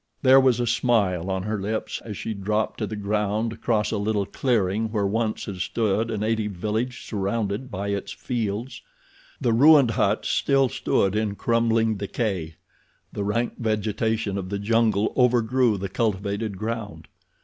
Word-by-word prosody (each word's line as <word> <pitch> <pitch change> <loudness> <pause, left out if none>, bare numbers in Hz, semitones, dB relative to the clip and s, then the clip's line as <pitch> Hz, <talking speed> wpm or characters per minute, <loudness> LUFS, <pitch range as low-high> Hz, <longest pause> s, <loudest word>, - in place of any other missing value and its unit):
There 130 0 +7
was 130 -3 +3
a 120 - +1
smile 110 -7 +1
on 95 -1 -1
her 105 0 -2
lips 110 +2 -3
as 105 -4 -7
she 110 - -4
dropped 105 +2 -2
to 110 - -1
the 110 - -5
ground 105 +2 -1
to - - -8
cross 110 -3 0
a 110 - -1
little 100 -1 0
clearing 110 -1 0
where 105 -3 0
once 110 +2 -1
had 100 -3 -6
stood 110 +3 0
a 110 - -2
native 110 0 -1
village 110 +7 -3
surrounded 105 +3 -2
by 100 0 -4
its 100 -1 -3
fields. 115 0 -4 0.6
The 120 - +1
ruined 140 0 +6
huts 105 -1 +1
still 135 -2 +2
stood 100 -3 0
in 105 -2 -1
crumbling 115 -1 +1
decay. 95 -6 -3 0.6
The 100 - -3
rank 115 +4 -1
vegetation 110 -2 -1
of 90 -1 -6
the 100 - -2
jungle 110 0 +1
overgrew 125 -2 +3
the 100 +1 -3
cultivated 100 0 -2
ground. 105 -7 -5
110 Hz, 160 wpm, -24 LUFS, 100-115 Hz, 0.6 s, There